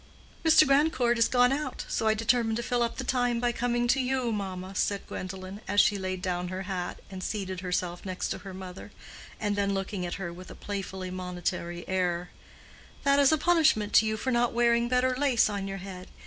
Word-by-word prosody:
"Mr. 315 -1 +7
Grandcourt 275 -4 +3
is 230 - +5
gone 245 0 +4
out, 295 +2 -3
so 220 - -1
I 220 - +4
determined 225 0 +1
to 235 - -3
fill 245 0 0
up 235 -1 -1
the 260 - -3
time 245 -2 +1
by 240 0 +1
coming 240 0 0
to 270 - +4
you, 255 -2 0
mamma," 190 -2 -4
said 200 +1 -1
Gwendolen, 185 +2 -7
as 200 +1 +2
she 205 -1 +4
laid 185 -1 -4
down 180 -1 -1
her 185 +1 -4
hat 185 -2 -4
and 185 -1 -6
seated 190 -3 -3
herself 180 -1 -2
next 185 -1 -3
to - - -3
her 195 - -9
mother; 185 +1 -9 0.5
and 205 -1 0
then 200 -1 0
looking 195 -1 -3
at 175 - -3
her 175 -3 -5
with 180 +1 -11
a - - -9
playfully 190 -2 -5
monitory 175 -1 -4
air, 180 -2 -1 0.7
"That 280 0 +4
is 280 0 +6
a 315 - +4
punishment 310 -10 +3
to 220 - +6
you 215 0 -1
for 260 - -2
not 240 0 +2
wearing 235 0 +3
better 255 0 +2
lace 255 -5 +3
on 200 -1 -3
your 195 0 -4
head. 185 -1 -8
205 Hz, 210 wpm, -28 LUFS, 185-245 Hz, 0.7 s, Mr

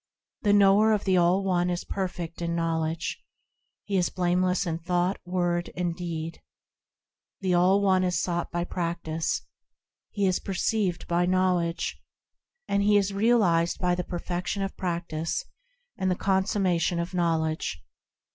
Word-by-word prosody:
The 205 - +2
knower 205 +2 +5
of 210 - 0
the 190 -1 +2
All 180 +3 +3
One 180 -2 +1
is 175 0 -2
perfect 175 -3 -4
in 170 0 -1
knowledge. 165 -1 -1 0.6
He 200 -2 -1
is 180 - +2
blameless 180 +1 +1
in 165 -1 -2
thought, 180 +2 0
word, 175 -1 -1
and 175 -2 -1
deed. 165 -2 -5 1.0
The 185 -2 +1
All 185 +3 +4
One 190 -1 +3
is 180 -1 +1
sought 175 -1 -1
by 175 0 -2
practice, 170 -2 -2 0.7
He 205 -2 -1
is 185 -1 +2
perceived 190 -1 -1
by 175 +1 +1
knowledge, 180 -2 0 0.7
And 200 - +1
he 205 +1 +4
is 200 0 +1
realised 195 -6 +3
by 180 -1 +1
the 180 0 -1
perfection 180 +3 -3
of 195 - -4
practice 170 - -3 0.5
and 190 - +1
the 180 - +2
consummation 190 -3 +1
of 170 +2 -3
knowledge. 160 - -1
180 Hz, 145 wpm, -27 LUFS, 170-190 Hz, 1.0 s, knower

